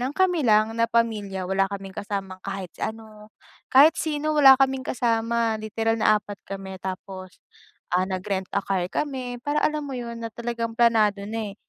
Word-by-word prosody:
nang 260 +4 -3
kami 370 -3 +2
lang 215 -4 +3
na 230 0 +1
pamilya, 210 -5 0
wala 195 +1 +1
kaming 195 -1 -7
kasamang 195 -2 -5
kahit 195 -2 -6
ano. 215 -1 -6 0.4
Kahit 285 +5 +7
sino 310 -1 -2
wala 275 -3 +8
kaming 265 0 +2
kasama, 230 -2 0
literal 225 +1 -1
na 215 0 +5
4 205 -1 -7
kami 190 -1 -7
tapos, 185 0 -7 0.6
ah, 180 +1 +3
nag-rent-a-car 190 0 -2
kami 260 -4 -3
para, 290 +1 0
alam 305 0 +1
mo 280 - -6
yun, 235 -1 -6
na 230 - -4
talagang 235 0 -3
planado 215 -4 +3
na 220 -2 -4
eh, - - -15
220 Hz, 165 wpm, -24 LUFS, 195-245 Hz, 0.6 s, wala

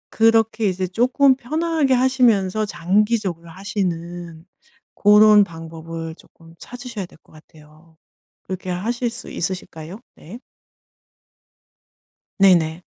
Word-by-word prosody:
그렇게 225 -1 +3
이제 185 0 -2
쪼끔 255 +7 +3
편안하게 310 +1 0
하시면서 230 -6 +2
장기적으로 190 -2 -1
하시는 175 -3 -5 0.5
고런 210 0 +6
방법을 165 -1 -8
쪼끔 165 -1 -20
찾으셔야 245 -6 -8
될 - - -20
것 - - -25
같아요. 155 +1 -20 0.5
그렇게 185 0 -6
하실 235 +7 -2
수 240 - -10
있으실까요? 180 0 -6
네. 195 +9 -12 2.0
네네. 175 -3 +3
190 Hz, 245 characters per minute, -21 LUFS, 165-230 Hz, 2.0 s, 고런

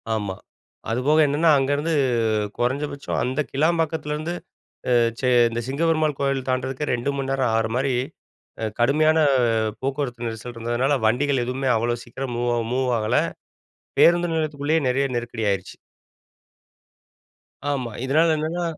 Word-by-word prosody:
ஆமா, 105 -4 -2 0.6
அதுபோக 135 +7 +2
என்னென்ன 145 +4 +1
அங்கேருந்து 145 +4 0 0.7
குறைஞ்சபட்சம் 140 +4 -2
அந்த 130 +4 -2
கிளாம்பாக்கத்திலேருந்து 160 +1 0 0.6
அ - - +5 0.3
சே 130 - +1 0.2
இந்த 115 +1 -3
சிங்கபெருமாள் 155 +1 +1
கோயில் 135 -2 -1
தாண்டறதுக்கு 130 +3 -2
2 120 +3 -1
மணி 135 -1 -3
நேரம் 130 -3 +1
ஆற 115 0 +1
மாரி 135 +1 +1 0.7
அ - - 0
கடுமையான 155 +6 +3 0.6
போக்குவரத்து 130 -3 -3
நெரிசல் 115 +2 -6
இருந்ததுனால 120 +5 0
வண்டிகள் 130 +3 +2
எதுவுமே 130 +2 -2
அவ்வளோ 120 +1 0
சீக்கிரம் 125 +1 -5
மூவ் 120 0 0 0.2
மூவ் 130 0 +1
ஆகல 110 0 +1 0.8
பேருந்து 175 0 +5
நிலையத்துக்குள்ளேயே 155 0 0
நெறைய 135 +2 +1
நெருக்கடி 120 -1 -4
ஆயிருச்சு. 95 -2 -3 1.9
ஆமா, 130 -5 -2
இதனால 155 +5 +3
என்னன்னா 160 +3 -2
135 Hz, 120 wpm, -23 LUFS, 120-150 Hz, 1.9 s, அ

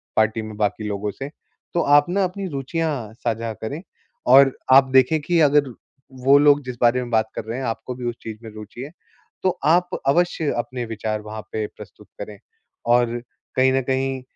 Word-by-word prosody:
Party 110 +1 +2
में 110 -1 -8
बाकी 105 +1 -1
लोगों 105 0 -3
से, 135 +6 -7 0.4
तो 170 - +2
आप 145 0 +5
ना 195 +2 +1
अपनी 190 +2 -3
रुचियाँ 140 -5 -3
साझा 115 -1 -1
करें 125 +9 -6 0.5
और 135 0 +7 0.2
आप 135 0 +7
देखें 130 +4 +5
कि 170 +3 +1
अगर 145 -2 +4 0.6
वो 140 +1 +7
लोग 145 0 +5
जिस 125 -1 -5
बारे 120 +1 +4
में 125 - -6
बात 110 -1 +2
कर - - -4
रहे 115 +2 -4
हैं, 135 - -3
आपको 115 +2 -4
भी 125 0 -7
उस 120 - -6
चीज़ 110 -1 -6
में 115 - -8
रुचि 110 +3 -9
है, 140 +3 -7 0.5
तो 185 -1 +1
आप 175 +3 +4 0.2
अवश्य 165 0 +2
अपने 120 0 -3
विचार 110 -1 -3
वहाँ 110 +1 -7
पे 110 -1 -2
प्रस्तुत - - -14
करें। 105 - -7 0.6
और 120 0 +2 0.3
कहीं 130 0 +4
न 135 - +2
कहीं 130 0 -1
130 Hz, 190 wpm, -22 LUFS, 110-145 Hz, 0.6 s, और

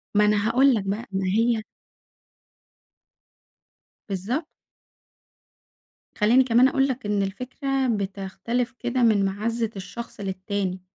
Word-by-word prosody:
ما 210 0 +5
أنا 210 0 +2
هاقول 260 +4 +5
لَك 210 - -1
بقى، 205 +5 -3
ما 190 0 -1
هي 225 +2 +2 2.5
بالضبط. 225 - -2 1.7
خلّيني 235 +5 +5
كمان 250 +1 +5
أقول 270 0 +2
لَك 260 -4 -4
إن 205 -1 +1
الفكرة 260 +6 -2
بتختلف 205 +3 -2
كده 245 0 0
من 210 -4 +4
معزّة 225 +3 -1
الشخص 200 +5 -8
للتاني، 190 -1 -3
220 Hz, 110 wpm, -24 LUFS, 195-245 Hz, 2.5 s, ما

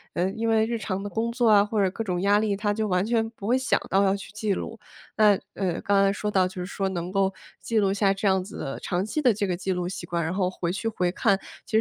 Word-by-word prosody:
呃， 180 +2 +1
因 225 +2 -2
为 220 0 +3
日 230 0 -2
常 195 -3 -3
的 205 - -5
工 230 +2 -1
作 240 -1 +1
啊 205 -1 +7
或 210 0 -1
者 190 - +3
各 225 - -4
种 180 -4 -2
压 205 +1 +4
力， 215 -2 0
他 205 0 0
就 215 0 -1
完 180 +2 +1
全 225 -1 +1
不 205 -2 -8
会 250 +2 +3
想 260 - +1
到 195 +1 +3
要 195 0 +3
去 200 - -8
记 210 -2 -1
录。 225 +4 -5 0.4
那， 210 -3 +5
呃， 185 -4 -2
刚 200 -1 +3
才 195 - +4
说 210 +1 -3
到 190 -3 +3
就 185 - -11
是 180 0 -4
说 195 0 -2
能 175 -1 -4
够 195 -1 +2 0.3
记 225 -2 0
录 195 -1 +2
下 200 -1 +2
这 200 +1 -1
样 190 -1 +2
子 200 - -9
的 135 - -5
长 180 +2 -1
期 305 +8 -2
的 245 -5 +4
这 200 -1 -1
个 180 - 0
记 190 +2 -3
录 180 -1 -1
习 180 -2 -6
惯， 170 0 -2
然 165 - -2
后 185 -2 +1
回 175 -2 -3
去 225 +3 -3
回 180 -5 0
看， 200 -1 +2 0.3
其 - - -14
200 Hz, 310 characters per minute, -25 LUFS, 185-220 Hz, 0.4 s, 啊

